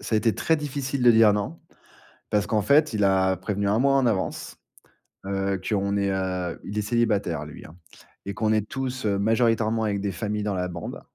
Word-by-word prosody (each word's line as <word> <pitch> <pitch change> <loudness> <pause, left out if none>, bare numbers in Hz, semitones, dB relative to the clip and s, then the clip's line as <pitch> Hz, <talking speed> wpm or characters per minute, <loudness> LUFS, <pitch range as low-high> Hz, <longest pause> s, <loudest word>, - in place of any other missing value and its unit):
ça 110 - -3
a - - +4
été 115 -1 +1
très 160 - +1
difficile 140 -2 -3
de 120 - +7
dire 110 -2 +6
non, 105 +11 -4 0.7
parce 105 -1 +1
qu'en 110 -2 +1
fait, 145 +4 +3
il 105 -1 +1
a 95 -1 +3
prévenu 100 +2 -2
1 105 +3 +2
mois 135 +1 +3
en 135 -2 +3
avance. 100 -5 -2 0.7
Heu, 95 -1 -2
qu'on 100 -1 0
est 100 -1 0
heu 90 -2 -2
il 105 - -6
est 105 - +1
célibataire 105 -9 0
lui 75 - -11
hein 80 +3 -13 0.5
et 100 - -4
qu'on 110 +1 0
est 110 -1 +1
tous, 130 -3 -4
heu, 100 -1 +1
majoritairement 115 0 +1
avec 100 -2 -1
des 100 0 -2
familles 105 +3 -3
dans 105 -1 -2
la 90 0 -1
bande. 85 -1 -7
105 Hz, 210 wpm, -25 LUFS, 95-115 Hz, 0.7 s, de